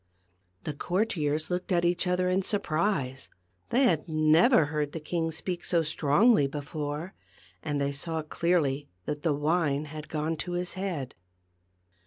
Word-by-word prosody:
The 155 Hz, -, -3 dB
courtiers 160 Hz, -3 st, -1 dB
looked 180 Hz, +2 st, -2 dB
at 175 Hz, -1 st, +3 dB
each 175 Hz, +1 st, +1 dB
other 180 Hz, 0 st, +1 dB
in 185 Hz, +1 st, +2 dB
surprise; 155 Hz, -8 st, -1 dB, 0.4 s
they 260 Hz, +3 st, +3 dB
had 170 Hz, -, +2 dB
never 155 Hz, -, +5 dB
heard 150 Hz, -1 st, -2 dB
the 165 Hz, -, -4 dB
king 165 Hz, +1 st, -2 dB
speak 175 Hz, +3 st, -4 dB
so 170 Hz, -2 st, +2 dB
strongly 155 Hz, -, +3 dB
before, 150 Hz, +4 st, -5 dB, 0.5 s
and 145 Hz, -2 st, -2 dB
they 140 Hz, 0 st, 0 dB
saw 160 Hz, +3 st, -3 dB
clearly 150 Hz, -4 st, 0 dB, 0.2 s
that 150 Hz, 0 st, -3 dB
the 155 Hz, -3 st, +1 dB
wine 150 Hz, -1 st, +1 dB
had 150 Hz, 0 st, -8 dB
gone 155 Hz, +1 st, -2 dB
to 175 Hz, +3 st, -4 dB
his 180 Hz, 0 st, -2 dB
head. 180 Hz, -9 st, -4 dB
160 Hz, 150 wpm, -28 LUFS, 150-180 Hz, 0.5 s, never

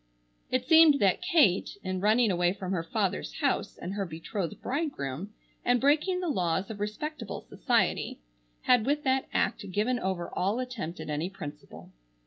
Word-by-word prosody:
It 255 Hz, 0 st, 0 dB
seemed 320 Hz, -2 st, +7 dB
that 195 Hz, -, +3 dB
Kate, 290 Hz, -, +3 dB
in 185 Hz, -1 st, -2 dB
running 215 Hz, +2 st, +4 dB
away 175 Hz, 0 st, +2 dB
from 190 Hz, -2 st, -5 dB
her 180 Hz, -3 st, 0 dB
father's 110 Hz, -, -2 dB
house -, -, 0 dB
and 180 Hz, -, -5 dB
her 200 Hz, -1 st, -1 dB
betrothed 170 Hz, +1 st, -5 dB
bridegroom, 205 Hz, -, -3 dB, 0.3 s
and 245 Hz, 0 st, +3 dB
breaking 305 Hz, +7 st, +2 dB
the 360 Hz, -, -2 dB
laws 185 Hz, -, 0 dB
of 210 Hz, -, -8 dB
respectable 225 Hz, +5 st, -4 dB
society, -, -, 0 dB, 0.5 s
had 245 Hz, -2 st, +4 dB
with 295 Hz, +1 st, +1 dB
that 265 Hz, 0 st, +1 dB
act 200 Hz, -, -1 dB
given 215 Hz, +6 st, 0 dB
over 185 Hz, -4 st, -3 dB
all 195 Hz, +5 st, 0 dB
attempt 240 Hz, -9 st, -5 dB
at -, -, -5 dB
any 155 Hz, +4 st, -1 dB
principle. 150 Hz, -7 st, -10 dB
205 Hz, 160 wpm, -29 LUFS, 180-260 Hz, 0.5 s, seemed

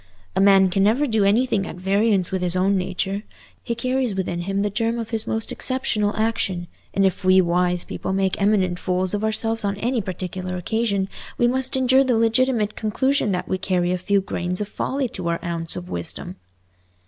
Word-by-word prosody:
A -, -, +2 dB
man 195 Hz, -1 st, +6 dB
can 195 Hz, +1 st, +1 dB
never 225 Hz, +9 st, +3 dB
do 220 Hz, -6 st, +1 dB
anything 210 Hz, -1 st, +2 dB
at -, -, -7 dB
variance 195 Hz, +1 st, +1 dB
with 190 Hz, -1 st, -1 dB
his 180 Hz, -1 st, 0 dB
own 190 Hz, +2 st, +2 dB
nature. 190 Hz, +2 st, -2 dB, 0.4 s
He 235 Hz, -, -3 dB
carries 255 Hz, -2 st, -1 dB
within 180 Hz, -2 st, -2 dB
him 195 Hz, +3 st, -1 dB
the 205 Hz, -, -1 dB
germ 230 Hz, +3 st, 0 dB
of 230 Hz, -1 st, -5 dB
his 225 Hz, -1 st, 0 dB
most 220 Hz, -1 st, -2 dB
exceptional 215 Hz, -5 st, 0 dB
action; 215 Hz, -5 st, 0 dB, 0.3 s
and 195 Hz, -, +2 dB
if 190 Hz, 0 st, 0 dB
we 185 Hz, 0 st, +6 dB
wise 180 Hz, 0 st, +1 dB
people -, -, -5 dB
make 190 Hz, 0 st, 0 dB
eminent 190 Hz, -3 st, +2 dB
fools 185 Hz, 0 st, -1 dB
of 205 Hz, +1 st, -1 dB
ourselves 225 Hz, +1 st, 0 dB
on 200 Hz, -1 st, -1 dB
any 235 Hz, +3 st, 0 dB
particular 185 Hz, -1 st, -4 dB
occasion, 200 Hz, +1 st, 0 dB, 0.3 s
we 240 Hz, -, +3 dB
must 260 Hz, +1 st, 0 dB
endure 260 Hz, +1 st, +4 dB
the 250 Hz, -4 st, +2 dB
legitimate 225 Hz, -1 st, +2 dB
conclusion 245 Hz, +2 st, 0 dB
that 180 Hz, -, -2 dB
we 185 Hz, -, -1 dB
carry 180 Hz, -1 st, 0 dB
a 180 Hz, -, +1 dB
few 200 Hz, +2 st, +2 dB
grains 180 Hz, -1 st, -3 dB
of 210 Hz, -, -2 dB
folly 265 Hz, +5 st, -2 dB
to 185 Hz, -5 st, -5 dB
our 170 Hz, 0 st, 0 dB
ounce 165 Hz, -1 st, -2 dB
of 180 Hz, 0 st, -6 dB
wisdom." 85 Hz, -, -5 dB
200 Hz, 195 wpm, -22 LUFS, 185-225 Hz, 0.4 s, man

